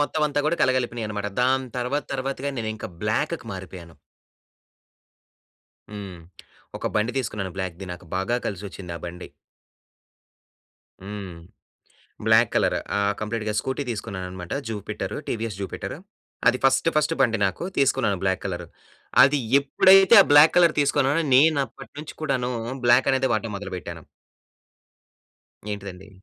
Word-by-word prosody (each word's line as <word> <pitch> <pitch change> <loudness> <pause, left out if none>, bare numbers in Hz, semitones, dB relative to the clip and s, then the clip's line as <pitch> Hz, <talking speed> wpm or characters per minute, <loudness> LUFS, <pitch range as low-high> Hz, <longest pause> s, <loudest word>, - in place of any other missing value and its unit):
మొత్తం 150 +1 0
అంతా 145 0 0
కూడా 170 - +1
కలగలిపినయన్నమాట. 115 -5 -1
దాని 130 0 +1
తర్వాత 135 +4 -1
తర్వాత‌గా 135 +1 -3
నేను 110 -1 -2
ఇంకా 110 - -7
బ్లాక్‌కి 115 +7 -1
మారిపోయాను. 90 -3 -9 2.0
హ్మ్. 100 -4 -8 0.6
ఒక - - -4
బండి 110 +3 +1
తీసుకున్నాను 105 -6 -3
బ్లాక్‌ది. 95 0 -4
నాకు 90 0 -11
బాగా 105 +6 0
కలిసొచ్చిందా 95 -3 -6
బండి. 90 +1 -7 1.7
హ్మ్. 100 -2 -7 0.9
Black 110 0 +5
colour. - - +2 0.2
ఆ! - - +1 0.2
కంప్లీట్‌గా 105 0 -3
స్కూటీ 130 +2 -3
తీసుకున్నానన్నమాట 95 -5 -5 0.2
జుపిటరు. 105 -3 -5
TVS 110 -3 -3
Jupiter. 100 +5 -5 0.5
అది 125 - +4
ఫస్ట్ 135 +4 +3
ఫస్ట్ 155 +1 +2
బండి 115 -4 +3
నాకు 95 - -3
తీసుకున్నాను 105 -7 +2
బ్లాక్ 95 -1 0
కలర్. - - -4 0.6
అది 140 +1 +4 0.2
ఎప్పుడైతే 190 +9 +6
ఆ - - +5
బ్లాక్ 145 +2 +8
కలర్ 170 -3 +5
తీసుకున్నానో, 145 +2 +2
నేను 155 +3 +5
అప్పటినుంచి 145 +5 -11
కూడాను 130 -5 -1 0.3
బ్లాకనేదె 130 +2 +4
వాడటం 110 -1 -2
మొదలుపెట్టాను. 90 -5 -7 1.7
ఏంటిదండి? 100 -1 -8
115 Hz, 115 wpm, -24 LUFS, 95-135 Hz, 2.0 s, బ్లాక్